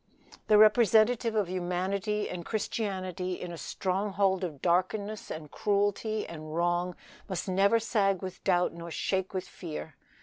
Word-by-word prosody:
The 210 Hz, -, +6 dB
representative 220 Hz, +1 st, +5 dB
of 210 Hz, -4 st, +2 dB
humanity 185 Hz, +4 st, -1 dB
and 180 Hz, -1 st, -5 dB
Christianity 185 Hz, -3 st, -3 dB
in 180 Hz, -, -6 dB
a -, -, -6 dB
stronghold 195 Hz, 0 st, 0 dB
of 155 Hz, -6 st, -4 dB
darkness 195 Hz, +6 st, 0 dB
and 155 Hz, -2 st, -7 dB
cruelty 205 Hz, +1 st, 0 dB
and 155 Hz, -1 st, -7 dB
wrong 175 Hz, +1 st, 0 dB, 0.3 s
must 185 Hz, -1 st, -3 dB
never 195 Hz, +4 st, +4 dB
sag 195 Hz, -5 st, +1 dB
with 185 Hz, -1 st, -7 dB
doubt 180 Hz, -3 st, +2 dB
nor 170 Hz, 0 st, -8 dB
shake 190 Hz, +3 st, -1 dB
with 185 Hz, -, -3 dB
fear. 160 Hz, -3 st, -7 dB
190 Hz, 140 wpm, -29 LUFS, 175-210 Hz, 0.3 s, The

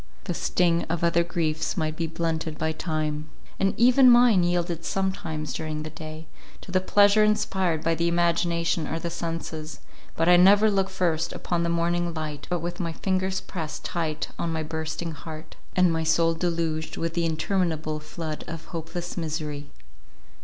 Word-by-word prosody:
The -, -, -3 dB
sting 170 Hz, -2 st, +2 dB
of 170 Hz, 0 st, -2 dB
other 170 Hz, 0 st, +3 dB
griefs 165 Hz, 0 st, -1 dB
might 155 Hz, -2 st, -1 dB
be 165 Hz, 0 st, -2 dB
blunted 160 Hz, -1 st, -2 dB
by 160 Hz, 0 st, 0 dB
time; 155 Hz, -2 st, -3 dB, 0.3 s
and 195 Hz, 0 st, +2 dB
even 250 Hz, +3 st, +7 dB
mine 240 Hz, -5 st, +6 dB
yielded 175 Hz, -1 st, 0 dB
sometimes 165 Hz, -5 st, -2 dB
during 155 Hz, -1 st, -4 dB
the 155 Hz, -, -7 dB
day, 155 Hz, 0 st, -8 dB, 0.4 s
to -, -, -10 dB
the 185 Hz, 0 st, +2 dB
pleasure 205 Hz, +2 st, +5 dB
inspired 190 Hz, -6 st, +1 dB
by 165 Hz, -, +2 dB
the 170 Hz, +1 st, 0 dB
imagination 170 Hz, -1 st, +1 dB
or 165 Hz, -, -2 dB
the 170 Hz, +1 st, -4 dB
senses; 165 Hz, -2 st, -5 dB, 0.4 s
but 165 Hz, -, +1 dB
I 180 Hz, 0 st, +8 dB
never 205 Hz, +4 st, +6 dB
look 195 Hz, -1 st, +1 dB
first 170 Hz, -3 st, 0 dB
upon 175 Hz, -1 st, -2 dB
the 170 Hz, -, 0 dB
morning 170 Hz, 0 st, 0 dB
light 150 Hz, -2 st, -5 dB
but 175 Hz, -2 st, -1 dB
with 175 Hz, +3 st, -4 dB
my 170 Hz, -3 st, -2 dB
fingers 190 Hz, +1 st, -1 dB
pressed 160 Hz, -5 st, -6 dB
tight 160 Hz, -3 st, -2 dB
on 170 Hz, -, -1 dB
my 160 Hz, -1 st, -2 dB
bursting 160 Hz, +1 st, -4 dB
heart, 155 Hz, +1 st, -9 dB, 0.2 s
and 185 Hz, -2 st, +4 dB
my 160 Hz, 0 st, 0 dB
soul 165 Hz, +1 st, +3 dB
deluged 165 Hz, -2 st, -2 dB
with 165 Hz, 0 st, -2 dB
the 170 Hz, -1 st, +1 dB
interminable 160 Hz, -2 st, -1 dB
flood 155 Hz, 0 st, -6 dB
of 165 Hz, 0 st, -7 dB
hopeless 170 Hz, +2 st, -5 dB
misery. 150 Hz, -3 st, -4 dB
165 Hz, 170 wpm, -26 LUFS, 160-175 Hz, 0.4 s, I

